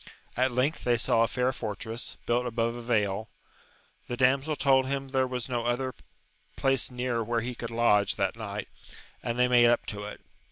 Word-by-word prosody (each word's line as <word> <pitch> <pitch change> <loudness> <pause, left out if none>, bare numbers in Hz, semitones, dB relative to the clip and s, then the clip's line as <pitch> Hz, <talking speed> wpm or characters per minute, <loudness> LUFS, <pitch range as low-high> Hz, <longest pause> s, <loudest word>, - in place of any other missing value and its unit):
At 130 +1 +2
length 130 +6 0
they 120 -1 +3
saw 115 0 +2
a 115 - +4
fair 125 +2 0
fortress, 110 0 -5
built 120 +1 +1
above 115 0 -1
a 120 - -6
vale; 110 -3 0 0.8
the 120 - -4
damsel 135 +4 +3
told 135 -2 +3
him 135 0 -2
there 130 -1 +1
was 125 -2 -4
no 120 -2 -1
other 130 +2 -1 0.6
place 135 -1 +1
near 125 -2 -1
where 115 +1 0
he 125 +2 -3
could 115 -1 -6
lodge 115 -3 +3
that 100 0 0
night, 105 -2 -5 0.5
and 120 0 -3
they 125 0 +4
made 120 -1 +6
up 120 0 +2
to 105 -1 -5
it. 105 - -8
120 Hz, 190 wpm, -28 LUFS, 115-130 Hz, 0.8 s, made